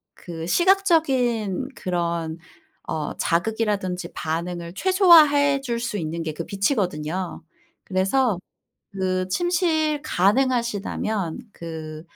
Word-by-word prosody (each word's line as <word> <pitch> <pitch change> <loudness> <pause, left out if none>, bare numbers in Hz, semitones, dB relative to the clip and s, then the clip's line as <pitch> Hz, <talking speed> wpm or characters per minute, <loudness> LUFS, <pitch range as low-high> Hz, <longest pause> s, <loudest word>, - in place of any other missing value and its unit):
그 165 -3 -7
시각적인 270 - +2
그런 170 -2 -2 0.5
어 155 -2 -3
자극이라든지 185 -1 -1
반응을 170 +1 -4
최소화해 305 - +5
줄 240 -3 -2
수 235 -2 -3
있는 165 -1 -3
게 155 -1 -3
그 165 +2 -5
빛이거든요. 185 - -2 0.4
그래서 195 +3 +1 0.5
그 185 -1 -1
침실 315 - +1
가능하시다면 215 -3 0
그 160 -2 -7
195 Hz, 220 characters per minute, -23 LUFS, 170-270 Hz, 0.5 s, 최소화해